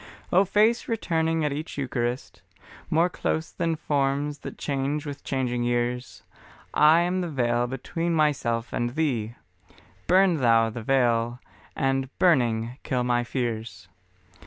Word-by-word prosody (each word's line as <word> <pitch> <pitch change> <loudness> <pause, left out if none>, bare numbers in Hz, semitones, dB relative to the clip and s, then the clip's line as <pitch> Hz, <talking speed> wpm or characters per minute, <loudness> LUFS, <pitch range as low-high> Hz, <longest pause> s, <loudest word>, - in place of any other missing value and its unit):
O 190 +3 +5
Face 215 +5 +2
returning 165 -8 0
at 145 - 0
each 155 +2 -6
Eucharist, 125 -2 -3 0.5
More 165 +2 +3
close 160 -2 -2
than 165 -2 -1
forms 145 -1 -1
that - - -8
change 140 +1 -2
with 145 -1 -7
changing 125 -3 -1
years, 120 +1 -2 0.5
I 155 +3 +6
am 180 +2 0
the 175 - -3
veil 120 -4 0
between 165 +7 -3
myself 125 -7 0
and 120 +2 -2
Thee, 120 -8 -1 0.7
Burn 185 -2 +4
Thou 115 -4 +3
the 120 - -6
veil, 120 -1 +1 0.4
and 135 0 0
burning, 120 -7 +2
kill 125 -2 -1
my 120 0 +1
fears. 115 -7 -4
135 Hz, 135 wpm, -25 LUFS, 120-160 Hz, 0.7 s, I